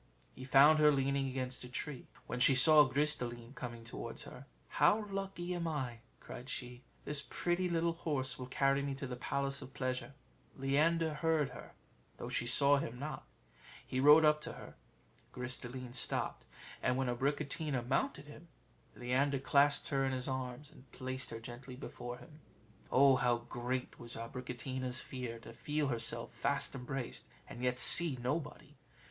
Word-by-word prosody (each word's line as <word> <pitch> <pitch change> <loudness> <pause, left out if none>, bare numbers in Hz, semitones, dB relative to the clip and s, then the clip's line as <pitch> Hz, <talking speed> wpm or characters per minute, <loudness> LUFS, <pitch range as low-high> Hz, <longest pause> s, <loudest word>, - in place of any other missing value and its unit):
He 130 - -9
found 145 +4 +7
her 150 0 +7
leaning 140 0 +1
against 130 -1 -4
a 125 - -9
tree. 135 +1 -5 0.2
When 125 - -4
she 130 +2 +5
saw 150 +3 +8
Gris 150 +3 +3
de 125 - -3
line 120 +1 -10
coming 120 -4 -7
towards 115 - -6
her, - - -11 0.2
"How 210 0 +3
lucky 195 -2 -3
am 170 -1 -2
I!" 130 -7 -3 0.2
cried 125 +3 -9
she; 125 -2 -6 0.2
"this 145 -1 +1
pretty 175 +1 0
little 170 0 +1
horse 145 -6 -1
will 125 - -5
carry 135 +1 +2
me 140 -1 -2
to 140 - -5
the 125 -1 -5
Palace 140 +2 -2
of 135 - -11
Pleasure." 130 +1 -3 0.4
Leander 155 +4 +2
heard 155 -2 +1
her, 125 - -11 0.4
though - - -6
she 120 - 0
saw 140 +3 +5
him 120 -3 -5
not: 150 +4 -6 0.6
he 130 - -2
rode 150 +3 +8
up 150 0 +4
to - - -6
her; - - -11 0.6
Gris 125 0 -4
de 120 - -7
line 125 -1 -7
stopped, - - -1 0.4
and 125 - +1
when 135 -1 0
Abricotina 135 +1 -1
mounted 140 +2 0
him, 150 +3 -13 0.5
Leander 135 +3 +1
clasped 140 +2 +3
her 135 -2 +1
in 135 -1 0
his 130 -1 -3
arms, 130 +2 -4
and 130 - -18
placed 130 0 -4
her 115 - -6
gently 125 +2 -9
before 120 -1 -7
him. 150 +3 -15 0.5
Oh, 135 0 +6
how 125 -1 +2
great 120 +2 -4
was 120 0 -7
Abricotina's 125 +2 -5
fear 125 -3 -6
to 115 - -11
feel 150 +4 -1
herself 120 -3 -2
fast - - -1
embraced, 130 -1 -5 0.2
and 120 - -9
yet 125 0 0
see 165 0 +6
nobody! 145 +5 -4
135 Hz, 170 wpm, -34 LUFS, 125-150 Hz, 0.6 s, saw